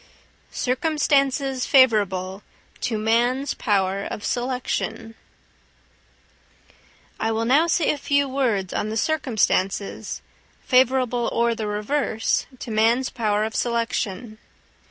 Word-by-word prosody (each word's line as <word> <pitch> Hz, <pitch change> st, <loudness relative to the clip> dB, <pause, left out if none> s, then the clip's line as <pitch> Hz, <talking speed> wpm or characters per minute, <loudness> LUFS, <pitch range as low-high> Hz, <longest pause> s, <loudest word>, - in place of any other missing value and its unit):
Circumstances 275 Hz, -1 st, +1 dB
favourable 200 Hz, -7 st, +3 dB, 0.4 s
to 230 Hz, -3 st, -2 dB
Man's 240 Hz, +5 st, +1 dB
Power 195 Hz, -1 st, 0 dB
of 205 Hz, -, -6 dB
Selection. 245 Hz, -2 st, -3 dB, 2.1 s
I 225 Hz, -, 0 dB
will 225 Hz, +1 st, -1 dB
now 285 Hz, +8 st, +4 dB
say 335 Hz, -1 st, +2 dB
a 295 Hz, -, -4 dB
few 285 Hz, 0 st, +1 dB
words 235 Hz, -9 st, -1 dB
on 210 Hz, -, -2 dB
the 220 Hz, -, -3 dB
circumstances, 220 Hz, -9 st, -1 dB, 0.4 s
favourable 250 Hz, -2 st, +2 dB
or 235 Hz, 0 st, +1 dB
the 220 Hz, -2 st, -4 dB
reverse, 220 Hz, +2 st, -1 dB
to 240 Hz, -, -7 dB
man's 230 Hz, +4 st, +2 dB
power 215 Hz, -3 st, 0 dB
of 220 Hz, 0 st, -3 dB
selection. 230 Hz, -2 st, -2 dB
235 Hz, 105 wpm, -23 LUFS, 215-265 Hz, 2.1 s, now